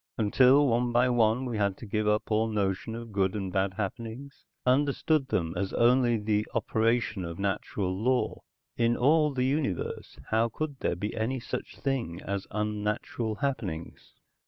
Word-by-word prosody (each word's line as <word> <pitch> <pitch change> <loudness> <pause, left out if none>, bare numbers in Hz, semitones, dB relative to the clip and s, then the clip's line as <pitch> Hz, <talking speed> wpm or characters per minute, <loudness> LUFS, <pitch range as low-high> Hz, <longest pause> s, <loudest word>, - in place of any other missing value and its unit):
Until 130 +6 +5
one 120 0 +1
by 120 +2 +3
one 120 +1 +2
we 120 -4 -3
had 100 -2 +1
to - - -9
give 105 +1 -1
up 105 +1 +1
all 110 +1 +2
notion 105 0 -1
of 115 -1 -8
good 95 -1 +1
and 95 -3 -3
bad 95 -1 0
happenings? 115 +6 -6 0.2
Understood 140 +2 +2
them 85 -9 -1
as 95 +1 -2
only 120 0 +4
the 105 0 0
operation 115 -3 +1
of 85 -1 -6
natural 95 -1 -2
law? 125 +6 0 0.4
In 120 0 +2
all 150 +3 +4
the 130 -2 0
universe, 135 - -2
how 115 +1 +3
could 145 +3 -4
there - - 0
be 105 +5 -4
any 120 +4 -1
such 115 - -6
thing 125 -11 -2
as 100 0 -4
unnatural 105 +1 -2
happenings? 95 -12 -4
110 Hz, 160 wpm, -28 LUFS, 100-125 Hz, 0.4 s, Until